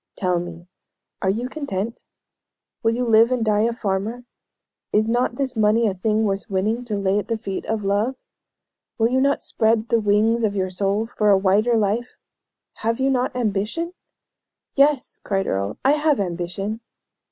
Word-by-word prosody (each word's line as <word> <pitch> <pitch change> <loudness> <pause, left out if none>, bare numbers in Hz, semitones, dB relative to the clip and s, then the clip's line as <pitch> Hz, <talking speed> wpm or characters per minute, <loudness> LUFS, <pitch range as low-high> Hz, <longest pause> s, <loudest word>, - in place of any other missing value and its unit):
Tell 180 -2 0
me, 175 0 -8 0.5
are 190 - +1
you 230 +6 -1
content? 235 -7 -4 0.8
Will 225 0 +2
you 250 +1 -1
live 230 +1 +5
and 245 -3 0
die 210 0 +3
a 235 - +1
farmer? 215 +2 -3 0.7
Is 215 +1 +2
not 240 +1 +1
this 265 -1 -2
money 220 +1 +3
a 205 - +1
thing 215 +4 0
worth 195 -2 -2
winning 210 +5 0
to 215 -3 -2
lay 200 0 +1
at 205 - -5
the 230 - -1
feet 195 -4 -5
of 220 -1 -1
love? 205 +6 0 0.8
Will 225 0 +3
you 260 +1 +2
not 280 +1 +1
spread 220 0 +1
the 230 - +3
wings 215 +2 +2
of 205 -2 +1
your 185 -1 -1
soul 200 +3 0
for 215 -2 0
a 200 - +6
wider 205 +5 +3
life? 220 +3 -1 0.6
Have 230 +2 -1
you 270 +1 +2
not 255 -1 0
ambition?" 235 - -1 0.8
"Yes!" 280 -1 +2
cried 195 -1 -1
Earle; 100 +2 -2
"I 270 - +6
have 300 -2 +2
ambition." 185 +3 -3
220 Hz, 175 wpm, -22 LUFS, 195-240 Hz, 0.8 s, a